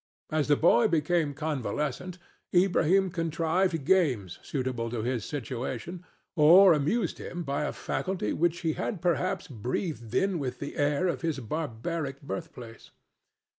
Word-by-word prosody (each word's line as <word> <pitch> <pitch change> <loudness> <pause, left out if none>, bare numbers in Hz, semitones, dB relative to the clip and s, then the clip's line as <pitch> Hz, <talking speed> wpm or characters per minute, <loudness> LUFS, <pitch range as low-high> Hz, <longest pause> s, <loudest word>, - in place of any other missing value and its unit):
As 155 -2 +1
the 145 - +5
boy 175 +9 +4
became 160 -4 +1
convalescent 150 - -3 0.4
Ilbrahim 185 +1 +3
contrived 165 -1 0
games 130 - +2
suitable 125 -4 -3
to 115 -2 -3
his 120 -2 -2
situation 135 +5 -5 0.3
or 175 +4 +8
amused 165 +7 0
him 175 0 -5
by 140 0 -1
a - - -2
faculty 185 - -2
which 170 +1 0
he 160 -2 0
had 195 - -3
perhaps 180 +2 0
breathed 125 - -4
in 195 -3 +1
with 130 -3 -3
the 145 - -6
air 145 +5 +1
of 175 - -2
his 165 -4 -1
barbaric 140 +2 -4
birthplace. 140 -7 -8
155 Hz, 135 wpm, -28 LUFS, 130-175 Hz, 0.4 s, or